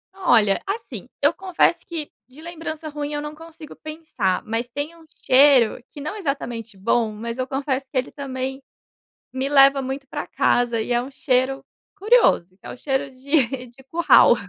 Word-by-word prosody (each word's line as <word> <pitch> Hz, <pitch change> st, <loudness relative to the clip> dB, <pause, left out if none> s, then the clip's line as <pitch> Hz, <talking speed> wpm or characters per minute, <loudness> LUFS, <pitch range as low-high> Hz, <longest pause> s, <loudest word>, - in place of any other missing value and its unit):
Olha, 225 Hz, -, +3 dB
assim, 405 Hz, +4 st, -5 dB
eu -, -, +5 dB
confesso 365 Hz, -2 st, +1 dB
que 320 Hz, -4 st, -5 dB, 0.2 s
de 255 Hz, +4 st, -17 dB
lembrança 325 Hz, -2 st, -6 dB
ruim 295 Hz, -1 st, -5 dB
eu 295 Hz, -, -2 dB
não 300 Hz, 0 st, -6 dB
consigo 325 Hz, 0 st, -12 dB
pensar, 305 Hz, -, -3 dB
mas 230 Hz, +2 st, -3 dB
tem 290 Hz, +6 st, -5 dB
um 330 Hz, -1 st, -18 dB, 0.2 s
cheiro, 255 Hz, -3 st, +5 dB
que -, -, -11 dB
não 300 Hz, +5 st, -4 dB
é -, -, -7 dB
exatamente 235 Hz, -, -4 dB
bom, 225 Hz, +3 st, +1 dB
mas 230 Hz, +3 st, -6 dB
eu 255 Hz, -, -1 dB
confesso 270 Hz, 0 st, -2 dB
que -, -, -3 dB
ele 255 Hz, -, -1 dB
também, 265 Hz, -1 st, -5 dB, 0.7 s
me 260 Hz, +1 st, -2 dB
leva 275 Hz, -1 st, +6 dB
muito 270 Hz, +1 st, -5 dB
para -, -, -5 dB
casa, 240 Hz, -1 st, +1 dB
e 220 Hz, -, -4 dB
é 240 Hz, -, +2 dB
um 255 Hz, -, -7 dB
cheiro 265 Hz, 0 st, 0 dB, 0.3 s
curioso, 400 Hz, -, +3 dB
é -, -, -10 dB
o -, -, -9 dB
cheiro 270 Hz, +1 st, -1 dB
de 260 Hz, -1 st, 0 dB
de 245 Hz, +3 st, -18 dB
curral. 340 Hz, +1 st, +6 dB
270 Hz, 180 wpm, -22 LUFS, 245-310 Hz, 0.7 s, leva